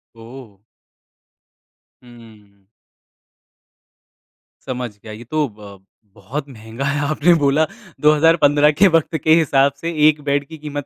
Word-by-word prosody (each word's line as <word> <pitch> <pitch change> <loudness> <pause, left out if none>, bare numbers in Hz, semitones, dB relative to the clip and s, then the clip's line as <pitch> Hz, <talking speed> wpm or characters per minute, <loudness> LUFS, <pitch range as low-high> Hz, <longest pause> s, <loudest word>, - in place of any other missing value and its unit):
ओह! 115 -3 -14 1.4
हुँ, 120 -1 -16
हुँ। 105 -4 -20 2.0
समझ 125 -2 -4
गया 110 - -10
ये 115 +3 -11
तो 150 +4 -2
ब 100 -2 -14 0.3
बहुत 130 +9 -7
महँगा 115 +2 -8
है 140 +1 -1
आपने 155 +3 +3
बोला। 145 +3 +2 0.4
2015 150 -1 +4
के 200 - +7
वक़्त 160 0 0
के 155 - +4
हिसाब 140 -3 +2
से 170 +1 -3 0.2
1 155 -1 +2
बेड 140 0 -1
की 160 +1 -11
कीमत 145 -2 -7
140 Hz, 125 wpm, -18 LUFS, 115-150 Hz, 2.0 s, के